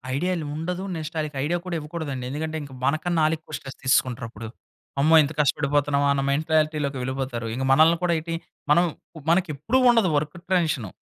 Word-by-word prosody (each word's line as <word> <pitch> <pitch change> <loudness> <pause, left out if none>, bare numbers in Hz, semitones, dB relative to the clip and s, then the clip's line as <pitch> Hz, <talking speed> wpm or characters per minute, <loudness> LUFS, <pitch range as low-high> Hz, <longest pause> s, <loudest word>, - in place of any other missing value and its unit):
ఐడియాలు 175 +1 -1
ఉండదు. 180 +4 -3
నెక్స్ట్ 160 0 -6
ఆళ్ళకి 150 -2 -4
ఐడియా 175 +3 0
కూడా 180 -2 -3
ఇవ్వకూడదండి. 150 -4 -5
ఎందుకంటే, 155 +3 -3
ఇంక 140 - -11
మనకన్నా 160 +4 +1
ఆళ్ళెక్కువ 155 0 -2
స్ట్రెస్ 135 -1 -10
తీసేసుకుంటరప్పుడు. 120 -3 0 0.5
అమ్మో! 155 +4 +5
ఇంత 145 - -3
కష్టపడిపోతన్నామా 145 0 +2
అన్న 140 - 0
మెంటాలిటీలోకి 155 -1 +1
వెళ్ళిపోతారు. 130 -2 -3
ఇంక 130 - -2
మనల్ని 160 +5 +6
కూడా 175 -1 +2
ఏటి 165 +1 -5 0.4
మనం 170 +4 +6 0.3
ప్ 160 - -9
మనకెప్పుడు 175 - +1
ఉండదు 230 -6 +4
వర్కు 150 +2 -3 0.2
టెన్షను. 150 - +1
155 Hz, 160 wpm, -24 LUFS, 140-165 Hz, 0.5 s, మనల్ని